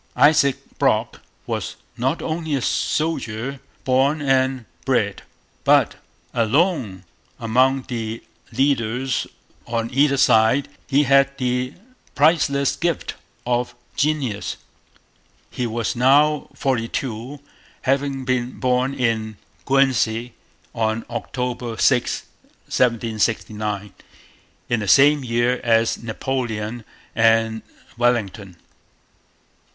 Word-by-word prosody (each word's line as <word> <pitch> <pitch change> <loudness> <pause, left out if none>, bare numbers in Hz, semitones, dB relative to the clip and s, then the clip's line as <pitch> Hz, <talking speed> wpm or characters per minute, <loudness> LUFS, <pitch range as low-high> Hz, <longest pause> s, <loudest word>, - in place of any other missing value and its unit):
Isaac 145 -3 +5 0.2
Brock - - +1 0.2
was - - -3 0.2
not 130 +7 -1
only 160 -2 -2
a 135 - -1
soldier 135 -4 -1 0.2
born 135 +4 +2
and 130 -3 +1 0.2
bred, - - 0 0.4
but, - - +3 0.4
alone 120 - +1 0.4
among 130 +4 +2
the 115 -3 -5 0.3
leaders 130 0 0 0.4
on 115 0 -2
either 140 +1 +3
side, 110 +3 +4 0.2
he 145 +1 +3
had 140 0 +3
the 125 +1 -1 0.4
priceless 140 -2 +3
gift 170 -2 -2 0.3
of 120 0 -1 0.2
genius. 140 -8 -1 0.9
He 125 - -2
was 115 0 -2
now 145 +4 +4
forty 125 -4 0
two, 125 +3 -5 0.4
having 135 0 0
been 125 -1 -1
born 130 +1 +1
in 110 -3 -1 0.3
Guernsey 120 -4 +2 0.4
on 110 0 -1
October 120 0 -4
6, 125 -3 +2 0.4
1769, 110 -3 -1 0.7
in 120 - +1
the 105 - -4
same 145 +6 +5
year 120 +1 0
as 115 -1 +2
Napoleon 115 -1 -3 0.3
and 115 0 +3 0.4
Wellington. 105 -6 0
125 Hz, 95 wpm, -21 LUFS, 115-135 Hz, 0.9 s, Isaac